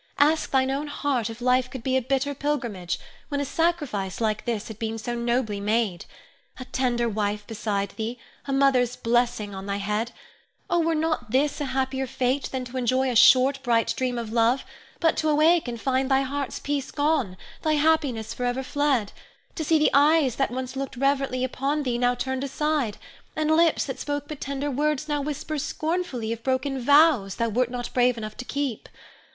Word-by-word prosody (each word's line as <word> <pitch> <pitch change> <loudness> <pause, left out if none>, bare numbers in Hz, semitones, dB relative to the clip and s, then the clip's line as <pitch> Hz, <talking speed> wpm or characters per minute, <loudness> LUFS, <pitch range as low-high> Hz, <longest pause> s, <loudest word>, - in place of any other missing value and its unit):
Ask 310 +2 +3
thine 265 0 +2
own 285 +2 -2
heart 280 -6 -1
if 225 +1 -9
life 255 0 +2
could 255 -2 -8
be 260 -1 0
a 260 - +3
bitter 270 +3 0
pilgrimage, 240 - -2 0.3
when 285 - -1
a 285 - -1
sacrifice 285 - -1
like 215 -2 -1
this 225 -3 -2
had 220 -2 -9
been 225 0 -3
so 230 +2 -4
nobly 235 -3 -1
made. 210 -3 0 0.5
A 255 - -6
tender 245 -2 0
wife 210 -1 -2
beside 205 -2 -2
thee, 225 +2 -4 0.3
a - - -2
mother's 265 -3 +3
blessing 235 -3 0
on 195 +1 -7
thy 200 0 -1
head, 210 +4 -2 0.6
oh, 345 - +3
were 330 0 +1
not 310 -6 -1
this 285 +5 +1
a - - 0
happier 265 0 -1
fate 255 +2 0
than 260 -1 -4
to 250 +1 -7
enjoy 255 +1 +1
a - - -3
short, 265 +4 +6
bright 230 -3 +2
dream 250 -1 -1
of 225 -2 -4
love, 235 +3 +2 0.3
but 325 -1 +3
to 310 - +1
awake 310 +1 +4
and 235 -1 -4
find 260 +2 0
thy 270 0 +4
heart's 275 0 -3
peace 285 -2 -2
gone, 285 -11 0 0.2
thy 310 - +1
happiness 290 -7 +1
forever 245 +1 -2
fled; 270 -6 0 0.4
to 320 - -3
see 320 +1 +3
the 305 - +3
eyes 285 -3 +4
that 270 - +1
once 255 +1 -5
looked 270 -2 -4
reverently 275 -1 +1
upon 275 +3 -1
thee 245 -3 -1
now 245 0 +2
turned 260 +2 -2
aside, 280 -5 -1 0.4
and 310 0 +1
lips 330 0 +3
that 265 - -5
spoke 290 0 -3
but 305 -2 -8
tender 280 +1 -2
words 300 +2 0
now 295 -1 0
whisper 300 +1 -3
scornfully 310 -8 -2
of 230 - -8
broken 265 +2 -1
vows 285 - +5
thou 230 - 0
wert 245 +3 +1
not 245 -1 -5
brave 250 -1 +3
enough 215 -1 -6
to 250 - -7
keep. 275 -5 -3
260 Hz, 190 wpm, -25 LUFS, 235-285 Hz, 0.6 s, short